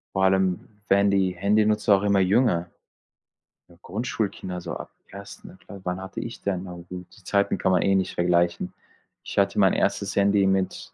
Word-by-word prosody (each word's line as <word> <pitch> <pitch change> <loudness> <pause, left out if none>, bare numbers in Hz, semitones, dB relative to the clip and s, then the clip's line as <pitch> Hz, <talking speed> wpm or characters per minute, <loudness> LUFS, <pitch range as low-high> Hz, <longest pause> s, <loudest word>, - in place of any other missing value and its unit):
Vor 95 - +1
allem 95 -1 +2 0.3
werden 100 +1 +4
die 95 -2 +2
Handynutzer 105 +2 +3
auch 95 - -1
immer 100 -1 +3
jünger. 95 -3 +2 1.0
Ja, 85 - -19
Grundschulkinder 100 -3 -4
so 85 -1 -6
ab - - -8 0.2
1. 100 -1 -11
Kla 100 +1 -12
Wann 90 0 -3
hatte 95 0 -7
ich 115 - -7
denn? 95 -2 -2
Na 90 -2 -8
gut, 90 +1 -9
die 105 - -19
Zeiten 100 +2 +1
kann 95 - +1
man 90 - +3
eh 100 0 +2
nicht 95 -1 0
vergleichen. 85 0 +1 0.5
Ich - - -8
hatte - - +2
mein - - +5
1. - - -1
Handy 100 0 +3
mit 95 -1 -1
95 Hz, 180 wpm, -25 LUFS, 90-100 Hz, 1.0 s, mein